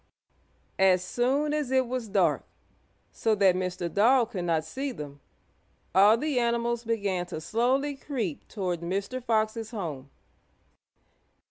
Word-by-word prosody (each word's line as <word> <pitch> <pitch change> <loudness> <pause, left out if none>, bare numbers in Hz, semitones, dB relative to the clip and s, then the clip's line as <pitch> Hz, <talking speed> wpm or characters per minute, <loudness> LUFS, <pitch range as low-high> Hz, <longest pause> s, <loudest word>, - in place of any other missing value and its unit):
As 185 -1 +4
soon 270 +9 0
as 300 -4 -1
it 260 0 +3
was 245 -1 -3
dark, 195 -3 +2 0.7
so 220 -1 +1
that 195 -3 +4
Mr. 180 -1 -2
Dog 235 +6 +3
could 180 -3 -3
not 160 -2 +1
see 270 - -4
them, 145 - -8 0.7
all 205 +4 +6
the 290 0 0
animals 235 0 0
began 200 -6 -1
to 160 - -5
slowly 260 - 0
creep 235 - -4
toward 180 -5 -3
Mr. 195 +8 -3
Fox's 220 -1 0
home. 155 - -5
220 Hz, 130 wpm, -27 LUFS, 185-245 Hz, 0.7 s, all